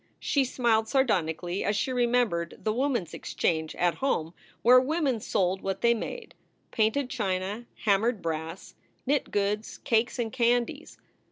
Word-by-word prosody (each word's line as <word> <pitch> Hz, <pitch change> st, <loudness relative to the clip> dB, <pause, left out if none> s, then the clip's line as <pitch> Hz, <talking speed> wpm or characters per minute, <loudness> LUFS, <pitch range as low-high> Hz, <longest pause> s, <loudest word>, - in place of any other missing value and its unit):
She 280 Hz, -2 st, +1 dB
smiled 230 Hz, -3 st, +1 dB
sardonically 180 Hz, -, 0 dB
as 205 Hz, -, 0 dB
she 260 Hz, +5 st, -1 dB
remembered 240 Hz, -9 st, +1 dB
The 215 Hz, -, +1 dB
Woman 255 Hz, -3 st, 0 dB
s 165 Hz, -, -15 dB
Exchange 160 Hz, -2 st, -2 dB
at 175 Hz, -1 st, 0 dB
home 165 Hz, -, 0 dB, 0.3 s
where 250 Hz, +2 st, +8 dB
women 275 Hz, -2 st, 0 dB
sold 190 Hz, -2 st, 0 dB
what 195 Hz, 0 st, -3 dB
they 235 Hz, 0 st, +5 dB
made 450 Hz, -, -6 dB, 0.4 s
painted 225 Hz, +5 st, +1 dB
china, 205 Hz, -1 st, -3 dB, 0.2 s
hammered 215 Hz, +2 st, +2 dB
brass, 165 Hz, +1 st, -5 dB, 0.3 s
knit 285 Hz, +1 st, +1 dB
goods, 205 Hz, +1 st, -1 dB
cakes, 235 Hz, -1 st, +1 dB
and 230 Hz, -3 st, -2 dB
candies. 240 Hz, -1 st, 0 dB
220 Hz, 145 wpm, -28 LUFS, 185-250 Hz, 0.4 s, where